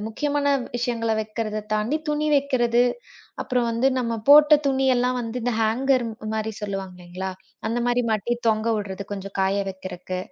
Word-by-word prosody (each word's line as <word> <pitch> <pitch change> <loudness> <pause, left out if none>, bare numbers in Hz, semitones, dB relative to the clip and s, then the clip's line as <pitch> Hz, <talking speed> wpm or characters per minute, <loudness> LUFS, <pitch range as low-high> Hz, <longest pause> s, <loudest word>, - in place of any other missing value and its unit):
முக்கியமான 285 +5 -1 0.3
விஷயங்கள 235 -2 -1
வைக்கிறதைத் 215 -1 -4
தாண்டி 215 +8 +1
துணி 300 0 0
வைக்கிறது. 245 -4 +2 0.6
அப்புறம் 250 -2 0
வந்து 230 +3 +1
நம்ம 235 -2 -1
போட்ட 300 +1 +9
துணி 270 -1 +1
எல்லாம் 250 +1 +1
வந்து 235 +1 -4
இந்த 245 - 0
ஹேங்கர் 250 +3 +2 0.3
மாரி 220 0 -2
சொல்லுவாங்கல்லைங்களா, 190 -2 -5 0.4
அந்த 235 +2 -1
மாரி 245 0 +2
மாட்டி 220 +3 0
தொங்க 215 0 +1
விடுறது 200 -1 -5
கொஞ்சம் 195 0 -6
காய 195 +1 +1
வைக்குறக்கு. 185 -1 -6
230 Hz, 145 wpm, -24 LUFS, 205-250 Hz, 0.6 s, போட்ட